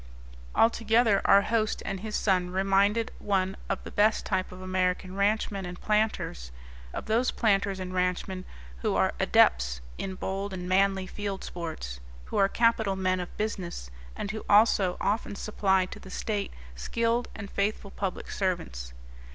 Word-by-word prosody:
Altogether, 225 -1 +4
our 200 0 +7
host 220 0 0
and 195 -1 -3
his 215 +2 -4
son 185 -3 +2
reminded 195 +4 +2
one 195 -2 0
of - - -2
the - - -8
best 215 +1 +3
type 185 -2 -1
of 185 - -10
American 185 0 -1
ranchmen 200 0 +1
and 180 0 -7
planters, 210 - 0 0.4
of - - -5
those 230 +4 +2
planters 200 -3 +1
and 185 0 -5
ranchmen 180 +1 -1 0.3
who 60 - -1
are - - +2
adepts 60 0 +4 0.2
in 190 -1 -3
bold 195 +1 -3
and 180 -1 -5
manly 195 0 +3
field 200 0 -4
sports, 160 - -6 0.3
who - - -4
are 195 -1 +4
capital 225 -4 +2
men 185 -1 +1
of 180 - -6
business, 180 - -4 0.2
and 200 - -3
who 215 0 -6
also 205 -3 +5
often 205 0 -1
supply 190 -2 +1
to - - -9
the 190 - -12
state 205 +1 -2 0.2
skilled 230 - 0
and 200 -1 -7
faithful 200 0 -1
public 195 -2 -4
servants. 60 - -2
195 Hz, 155 wpm, -28 LUFS, 185-210 Hz, 0.4 s, our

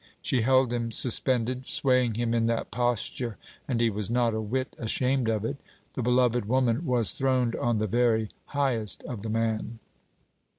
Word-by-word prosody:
She 125 - +1
held 130 +1 +3
him 120 -1 -1
suspended, 125 +2 +1
swaying 125 -4 +2
him 115 0 -1
in 115 -1 +2
that 115 0 -2
posture; 120 0 -2 0.3
and 125 -4 -1
he 115 -1 +2
was 105 0 -3
not 120 -1 +1
a 110 - -2
whit 130 +5 -3
ashamed 125 +2 0
of 110 -1 -1
it. 140 +5 -3 0.4
The - - -3
beloved 125 -1 +2
woman 130 +5 +1
was 120 -4 +1
throned 130 -3 +1
on 120 -2 0
the 110 - 0
very 110 -1 +1 0.2
highest 125 -8 0
of 115 -5 -6
the 110 - -5
man. 115 0 -1
120 Hz, 170 wpm, -27 LUFS, 115-125 Hz, 0.4 s, held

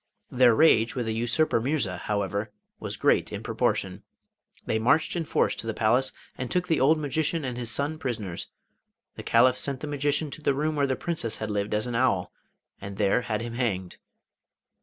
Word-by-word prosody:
Their 125 -2 +5
rage 115 -7 +4
with 125 -2 -2
the 110 - -1
usurper 120 +3 +1
Mirza, 120 -8 -1
however, 100 +2 -2 0.3
was - - -5
great - - +2
in - - -5
proportion. - - -1 0.6
They 110 - 0
marched 145 +10 +2
in 170 -2 -2
force - - +1
to 115 - -6
the 110 - -2
palace 120 +5 +2 0.2
and 130 -2 -5
took 180 0 0
the 160 -3 +2
old 145 +5 +4
magician 155 +1 -1
and 125 -2 -3
his 120 -2 -3
son 145 +5 0
prisoners. 110 - -4 0.7
The - - -7
Caliph 125 0 +3
sent 140 -2 -2
the - - -4
magician 145 +1 0
to 155 - -8
the 140 -2 +1
room 155 +2 -1
where 140 -1 +1
the 130 - 0
Princess 125 -6 -2
had 110 -1 -4
lived 105 0 -1
as 105 - 0
an 120 - -4
owl, 115 -7 +1 0.5
and 100 0 -7
there 100 +3 +2
had 115 -2 -3
him 120 -1 -6
hanged. 100 -7 -2
125 Hz, 195 wpm, -26 LUFS, 110-145 Hz, 0.7 s, Their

